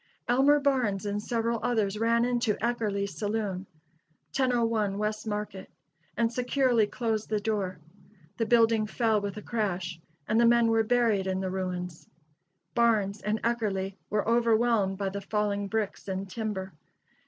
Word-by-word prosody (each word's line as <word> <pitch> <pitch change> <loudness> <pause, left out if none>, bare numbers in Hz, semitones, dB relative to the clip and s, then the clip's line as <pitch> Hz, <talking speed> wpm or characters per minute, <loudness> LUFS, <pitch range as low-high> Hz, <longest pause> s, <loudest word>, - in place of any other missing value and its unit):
Elmer 270 +4 +5
Barnes 250 -9 +1
and 205 0 -2
several 230 0 -1
others 215 -4 0
ran 230 +1 +3
into 240 -3 +1
Eckerle's 215 -4 -1
saloon, 205 -3 -2 0.7
1001 230 -6 +1
West 215 +1 -2
Market, 210 -2 -4 0.5
and 230 0 +1
securely 250 -2 +2
closed 220 -1 -2
the 215 -1 +1
door. 200 -4 -2 0.6
The 225 - 0
building 225 -2 +4
fell 220 -2 +1
with 200 0 -4
a 210 - -7
crash, 185 -6 -2 0.3
and 225 +2 +3
the 235 - +6
men 235 -1 +4
were 225 0 +4
buried 220 -4 +2
in 190 0 -1
the 190 -1 -2
ruins. 180 -2 -4 0.7
Barnes 215 -4 +2
and 210 +2 -1
Eckerle 205 -5 -1 0.2
were 210 0 0
overwhelmed 230 -4 +2
by 195 -1 -1
the 200 +1 -5
falling 205 0 -1
bricks 215 -1 -3
and 190 0 -3
timber. 195 -3 -4
215 Hz, 145 wpm, -28 LUFS, 200-235 Hz, 0.7 s, the